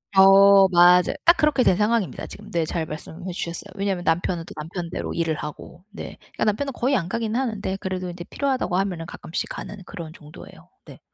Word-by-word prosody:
어. 195 0 +8
맞아 180 0 +5
딱 340 - +7
그렇게 300 -4 +3
된 185 - +4
상황입니다 210 0 0
지금. - - -11
네 170 -1 +1
잘 165 0 -2
말씀해 160 +4 -7
주셨어요. 170 -1 -5
왜냐하면 195 -3 -2
남편은 165 +1 0
또 - - -10
남편대로 170 +2 -5
일을 165 -2 0
하고 150 +4 -9
네 210 - -8
그러니까 - - -4
남편은 265 +7 0
거의 260 +3 +1
안 180 -6 -1
가긴 225 0 -2
하는데 220 -7 -2
그래도 185 -2 -4
인제 175 0 -7
필요하다고 260 -9 -1
하면은 180 -4 -2
가끔씩 170 0 -5
가는 205 - -7
그런 170 -5 -8
정도예요. 150 -2 -14 0.2
네. - - -13
185 Hz, 435 characters per minute, -23 LUFS, 170-210 Hz, 0.2 s, 어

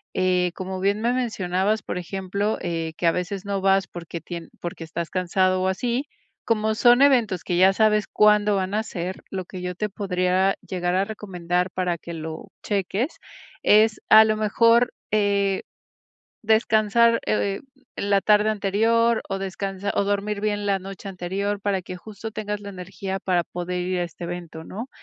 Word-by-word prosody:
Eh, 180 -1 +2
como 190 0 -5
bien 200 +3 +1
me 235 +2 +2
mencionabas, 210 -4 0
por - - -4
ejemplo, 195 +3 -2
eh 165 -2 -3
que - - -2
a 165 - +6
veces 180 +2 -3
no 200 -1 -1
vas 195 0 +3
porque 170 -1 -7
tien 170 0 -7
porque 170 -1 -5
estás 165 +1 -4
cansado 185 0 +1
o 185 - +1
así, 240 +8 -1 0.4
como 220 -1 +1
son 240 +4 +5
eventos 235 -10 +3
que 175 - -1
ya 190 +2 +6
sabes 215 0 +3
cuándo 210 -1 +4
van 190 0 -1
a 215 - +2
ser, 185 -3 -5
lo 185 -2 -4
que 185 +1 -8
yo 180 0 -4
te 210 +4 -1
podría 185 -1 +1
llegar 180 -1 -1
a 190 +1 +2
recomendar 180 -4 -2
para 180 -1 -1
que 170 - -8
lo 160 0 -6 0.2
cheques 205 - -1 0.4
es, 215 +1 +4
a 220 0 +9
lo 215 0 +1
mejor, 230 +3 +3 0.2
eh, 200 -2 +2 0.8
descansar, 220 +1 +3
eh, 200 -2 0 0.4
en 200 - -3
la 200 -1 +4
tarde 210 +1 +4
anterior 225 +3 +2
o 195 - -2
descansar 195 +1 -3
o - - +2
dormir 205 +1 -1
bien 205 -1 -1
la 195 -1 +1
noche 195 +1 -8
anterior 195 +2 -3
para 200 -1 0
que 185 - -7
justo 215 +3 -8
tengas 210 -1 -3
la 200 0 -7
energía 190 +1 -5
para 180 -2 +1
poder 180 +1 -4
ir 180 0 -1
a - - +1
este 170 0 -8
evento, 170 -2 -6
¿no? 225 +10 -7
195 Hz, 175 wpm, -24 LUFS, 180-210 Hz, 0.8 s, a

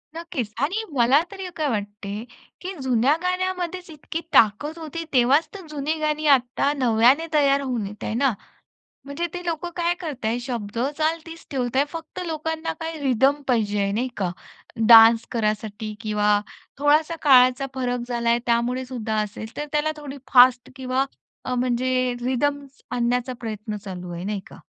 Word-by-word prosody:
नक्कीच 330 - -4
आणि 380 +10 0
मला 265 +3 +4
तरी 385 -2 -6
काय 310 -2 -1
वाटते 205 -1 -4 0.4
की, 375 +2 -5
जुन्या 260 +2 +3
गाण्यामध्येच 365 -1 -2
इतकी 315 +2 -6
ताकद 230 +9 +3
होती. 330 +1 -5
तेव्हाच 265 +6 +4
तर 385 -3 -9
जुनी 300 0 -2
गाणी 305 0 -1
आता 255 +3 -1
नव्याने 250 +4 +4
तयार 280 -2 +4
होऊन 245 -6 -2
येत 210 +1 -10
आहेत 220 - -2
ना. 270 -2 +2 0.7
म्हणजे 280 +5 -3
ते 355 0 -5
लोक 335 0 -2
काय 345 0 +1
करत 295 -9 -6
आहे? 230 +2 0
शब्द 230 -4 -5 0.2
,चाल 315 +1 +1
तीच 330 0 -11
ठेवत 255 -3 -2
आहे. 275 - +4
फक्त 325 +2 -8
लोकांना 320 0 -3
काय 325 0 -4
रिदम 270 +2 +3
पाहिजे, 205 -5 +1
नाही 245 +5 -1
का? 185 -3 -1 0.6
डान्स 225 0 +8
करायसाठी 215 -1 -2
किंवा 210 -1 +2 0.4
थोडासा 300 +3 +3
काळाचा 255 -1 +5
फरक 250 -1 -1
झाला 235 -1 -1
आहे 235 - +3
त्यामुळे 240 +2 +1
सुद्धा 230 -4 -3
असेल. 220 +2 -8
तर 295 - -2
त्याला 300 +1 +1
थोडी 290 -2 -8 0.2
फास्ट 245 -1 +6
किंवा 260 0 0 0.4
अ, 255 - -2
म्हणजे 255 0 +1
रिदम 280 +3 0 0.3
आणण्याचा 245 +1 0
प्रयत्न 215 -1 -5
चालू 185 -3 -8
आहे 170 +1 -6
नाही 205 0 -2
का?" - - -13
255 Hz, 160 wpm, -23 LUFS, 230-305 Hz, 0.7 s, डान्स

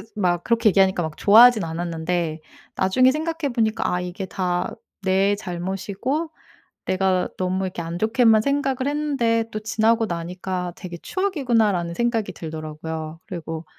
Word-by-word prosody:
막 175 -4 0
그렇게 230 -1 +3
얘기하니까 190 -2 +3
막 160 -1 -5
좋아하진 225 +1 +7
않았는데 165 0 -2 0.4
나중에 255 +8 +4
생각해 315 -1 -2
보니까 220 -2 0
아 180 - 0
이게 180 +2 -5
다 180 -1 -1 0.3
내 195 +2 +3
잘못이고 195 - -3 0.6
내가 185 -1 +1
너무 185 +1 -1
이렇게 180 -2 -5
안 170 +1 -5
좋게만 220 -1 +4
생각을 275 0 0
했는데 275 -6 +1
또 215 - -3
지나고 225 +1 +2
나니까 180 +1 -4
'되게 175 -3 -8
추억이구나.'라는 230 - 0
생각이 235 0 0
들더라고요. 160 0 -6
그리고 165 -4 -6
190 Hz, 350 characters per minute, -23 LUFS, 175-230 Hz, 0.6 s, 좋아하진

